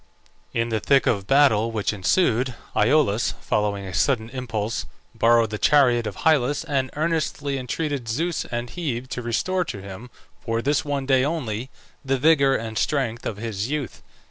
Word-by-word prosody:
In 115 0 -1
the 110 -1 0
thick 135 +5 +3
of 105 - +2
the 95 - -15
battle 115 -3 +4
which 110 -1 -1
ensued, 120 - +1 0.2
Iolaus, 120 -2 +2
following 105 -2 -1
a 95 - -7
sudden 115 - +1
impulse, 115 -4 -3 0.3
borrowed 115 -1 +3
the 105 - -4
chariot 125 -6 +4
of 100 - -5
Hyllus, 145 -2 +3
and 135 -5 -1
earnestly 155 -3 -1
entreated 135 -1 -3
Zeus 165 +8 -1
and 120 0 -4
Hebe 130 -8 -3
to 125 - -4
restore 180 +11 0
to 100 - -6
him, 100 +5 -9 0.3
for 115 -1 -2
this 140 -2 +1
one 140 -2 -2
day 130 -1 +3
only, 130 -6 -2 0.3
the 135 -1 0
vigour 140 -1 +4
and 110 -1 -3
strength 120 -5 -1
of 105 - -4
his 110 0 -3
youth. 145 -4 -4
125 Hz, 170 wpm, -23 LUFS, 110-145 Hz, 0.3 s, battle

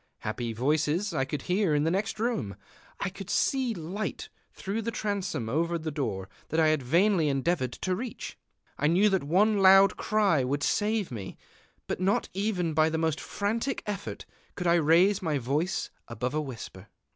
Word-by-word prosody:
Happy 120 -1 -3
voices 150 - 0
I 135 -4 0
could 145 0 -4
hear 180 -3 +1
in 145 - +2
the 160 - +1
next 210 +4 -1
room; 220 - -1 0.4
I 200 - -1
could 195 0 -9
see 260 -4 +1
light 185 +6 -5 0.2
through 205 +4 -4
the 230 - -3
transom 200 - -2
over 165 +7 0
the 160 -1 -4
door 110 -10 -3 0.2
that 160 - 0
I 160 -1 +5
had 155 -2 +2
vainly 170 +4 +3
endeavored 135 -1 0
to 185 -1 -2
reach; 235 +2 -6 0.4
I 150 - +2
knew 185 +6 +4
that 190 -5 +1
one 200 +8 +3
loud 195 0 +7
cry 200 -10 +2
would 140 +3 -1
save 210 -1 0
me. 100 -6 -7 0.5
But - - -3
not 190 +2 +1
even 185 -4 -1
by 155 +1 +4
the 160 - -1
most 160 -1 0
frantic 230 +6 -2
effort 205 -1 -5 0.3
could 180 - -4
I 170 - +4
raise 170 +5 +4
my 160 -5 0
voice 145 +9 -1 0.2
above 125 +3 -3
a 155 - 0
whisper.... 130 -6 -8
170 Hz, 180 wpm, -28 LUFS, 145-200 Hz, 0.5 s, loud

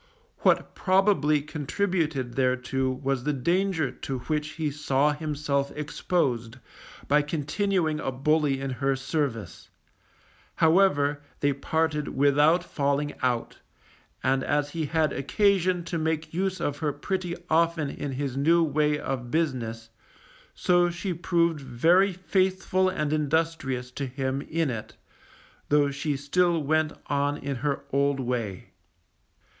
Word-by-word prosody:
What - - +2
probably 185 -7 +2
contributed 150 -4 -1
thereto 130 +1 0
was 130 0 -2
the 150 +2 0
danger 170 +1 0
to 135 -1 -5
which 150 +2 -2
he 155 -3 -2
saw 145 0 +1
himself 145 -2 -2
exposed 130 -6 -1 0.5
by 150 +1 +4
continuing 155 +2 -1
a 135 - -2
bully 140 +1 +1
in 135 0 -3
her 135 +1 0
service; 130 - -3 0.9
however, 160 -4 +3 0.2
they 145 -1 +3
parted 150 +1 -1
without 145 +5 +4
falling 145 -2 -1
out, 125 -2 -1 0.6
and 130 0 +2
as 145 0 0
he 160 -2 -2
had 160 0 +1
occasion 185 +3 +2
to 170 0 -3
make 160 0 -2
use 185 +1 -1
of 145 -4 -2
her 150 -2 0
pretty 175 +4 -3
often 165 -2 +2
in 140 -2 -5
his 135 -1 -3
new 165 +5 +4
way 150 -1 +1
of 130 -4 -4
business, 120 -8 -2 0.7
so 175 -1 +3
she 180 +2 -3
proved 170 -2 +1
very 165 +10 +3
faithful 185 0 +1
and 150 -5 -1
industrious 150 -4 -1
to 135 +2 -4
him 130 +1 -2
in 160 -2 -1
it, 110 -3 -6 0.7
though 145 -1 +3
she 145 +1 -2
still 170 +5 +2
went 155 +1 +1
on 145 0 0
in 140 -2 -4
her 140 +2 -2
old 140 0 +2
way. 120 -7 -3
150 Hz, 130 wpm, -26 LUFS, 135-165 Hz, 0.9 s, by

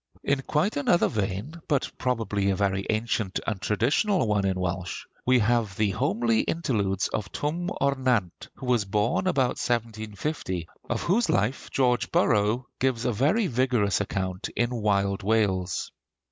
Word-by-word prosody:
In 140 -1 +1
quite 155 +8 0
another 170 +5 +3
vein, 105 - -3
but 140 -3 0
probably 110 -5 0
a 95 - +2
very 100 0 0
ancient 110 -3 0
and 105 -4 -2
traditional 130 - +2
one 105 -2 +1
in 95 -1 -1
Welsh, 90 0 -3 0.2
we 130 0 +6
have 115 -3 +1
the 105 -2 +2
homely 115 +1 +1
interludes 105 - 0
of 100 -2 -3
Twm 170 +4 -2
O'r 140 0 +3
Nant, 125 -9 -1
who - - -9
was 125 -3 +2
born 105 - 0
about 135 -8 +1
1750, 110 - -3 0.2
of - - -1
whose 220 +7 +2
life 105 +7 0
George 125 -2 +1
Borrow 110 +4 +2
gives 130 -3 0
a 120 - +1
very 155 - +2
vigorous 125 - +1
account 95 -2 -3
in 120 0 +1
'Wild 100 -3 +1
Wales.' 100 -4 0
110 Hz, 150 wpm, -26 LUFS, 100-130 Hz, 0.2 s, we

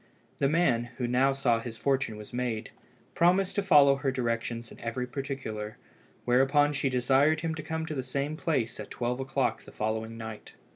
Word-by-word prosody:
The 140 - +3
man, 150 -8 +2
who 125 - -1
now 125 +3 +3
saw 135 -4 +2
that 115 - -6
his 115 -1 -7
fortune 135 -5 0
was 105 +3 -11
made, 120 -3 -2 0.4
promised 180 +3 +3
to - - +4
follow 145 -7 +6
her 140 -1 0
directions 115 -2 -2
in - - -13
every 120 +2 -3
particular, 125 -5 -5 0.5
whereupon 135 +4 +4
she 140 -1 0
desired 135 +5 +3
him 165 0 -1
to 155 - -5
come 160 +1 -3
to 155 - -4
the 135 - -2
same 140 +4 -2
place 130 -8 -1
at - - -7
twelve 125 +1 -2
o'clock 135 0 -1
the - - -14
following 110 +1 -3
night. 110 -1 -8
130 Hz, 190 wpm, -29 LUFS, 115-145 Hz, 0.5 s, follow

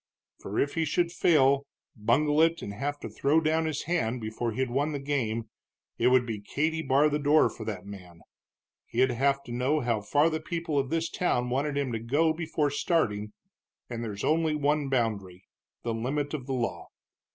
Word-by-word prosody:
"For 100 - -6
if 140 - +1
he 165 - 0
should 170 +3 0
fail, 140 -5 +3 0.3
bungle 145 +8 +2
it, 165 +1 +2
and 100 - -5
have 145 +6 -3
to - - -5
throw 145 +3 +2
down 160 0 +1
his 150 -2 -2
hand 130 -8 -1
before 110 +1 -3
he'd 130 +2 -2
won 145 +4 0
the 145 - -2
game, 115 -6 -2 0.5
it 120 - +4
would 125 -1 +4
be 110 -3 -4
Katy 155 +9 -1
bar 140 0 +3
the 150 0 0
door 150 +2 +4
for 110 - -8
that 100 -4 -5
man. 90 -4 -11 0.7
He'd 130 0 +2
have 140 +3 +1
to 120 - -10
know 130 +5 +1
how 115 -4 0
far 145 +10 +2
the 160 - -1
people 165 -2 -2
of 135 -1 -2
this 165 +1 0
town 125 -9 0
wanted 140 +2 0
him 140 -3 -1
to 115 - -2
go 145 +8 +2
before 160 -3 -1
starting, 105 -9 0 0.6
and 120 -1 -4
there's 105 -3 -5
only 160 0 +2
one 145 -1 +1
boundary 100 -8 -2 0.4
the 115 - -1
limit 140 +6 -2
of 140 -4 -5
the 135 - -2
law. 120 -2 -2
140 Hz, 195 wpm, -28 LUFS, 115-155 Hz, 0.7 s, it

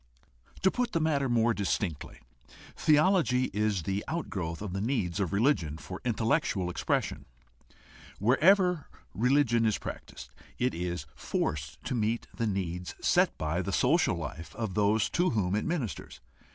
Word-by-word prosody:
To 190 - +5
put 245 -1 -1
the 165 - +2
matter 145 -4 +1
more 115 -1 +3
distinctly, 100 -6 -3 0.5
theology 150 -5 +3
is 105 -3 0
the 100 +3 -2
out 170 +2 -3
growth 85 -5 -3
of 100 -4 -5
the 95 - -2
needs 105 -6 -1
of 95 -5 0
religion 100 - +1
for 95 +3 -8
intellectual 110 - 0
expression. 70 - -1 0.9
Wherever 175 - +4 0.3
religion 120 -1 +3
is 110 -2 +2
practiced, - - -8 0.3
it 125 +1 +1
is 85 -3 -3
forced 75 0 -3
to - - -3
meet 115 0 0
the 115 - -1
needs 90 -3 -3
set - - +2
by 80 +3 -1
the 95 - -3
social 135 - +3
life 80 0 -7
of 110 -4 -3
those 105 +2 +2
to 180 +1 +2
whom 100 -5 0
it 105 - 0
ministers. 155 - -3
110 Hz, 150 wpm, -29 LUFS, 90-135 Hz, 0.9 s, To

